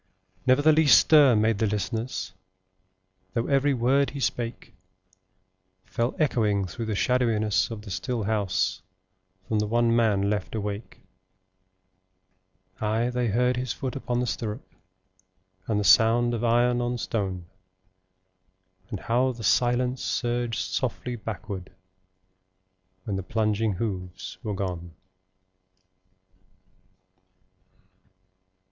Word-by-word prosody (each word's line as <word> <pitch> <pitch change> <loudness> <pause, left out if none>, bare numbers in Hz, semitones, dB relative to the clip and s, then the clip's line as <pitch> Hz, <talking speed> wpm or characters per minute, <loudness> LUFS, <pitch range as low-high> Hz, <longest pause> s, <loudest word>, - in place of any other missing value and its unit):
Never 130 +3 +4
the 155 - +6
least 155 -1 +6
stir 145 -6 +6
made 110 -1 +2
the 110 - +2
listeners, 105 +1 -3 1.0
Though 115 - 0
every 140 0 +2
word 135 +4 +2
he 140 - -7
spake 120 -5 -3 1.1
Fell 120 +2 -2
echoing 105 -9 +1
through 110 +5 -6
the 110 - -1
shadowiness 110 -3 +1
of 110 -3 -7
the 100 - -9
still 120 +3 -2
house 95 -3 0 0.7
From 110 - 0
the 105 - 0
one 115 +1 +2
man 105 -4 +2
left 105 0 -2
awake: 105 0 -5 1.8
Ay, 110 +3 0
they 125 -1 0
heard 125 +3 +1
his 125 -1 -2
foot 130 0 -5
upon 125 -3 -2
the 125 - 0
stirrup, 110 -3 -4 1.0
And 105 -2 +1
the - - 0
sound 115 +5 +5
of 115 0 -2
iron 120 +1 +3
on 120 0 -1
stone, 95 -6 -3 1.4
And 105 -6 -5
how 125 +3 +1
the 115 -1 -9
silence 125 +4 +2
surged 120 -2 -1
softly 120 +6 -3
backward, 100 -4 -6 1.3
When 100 -1 -3
the - - -2
plunging 110 +1 0
hoofs 95 -3 -5
were 105 -3 -3
gone. 85 -3 -5
115 Hz, 115 wpm, -26 LUFS, 105-125 Hz, 1.8 s, the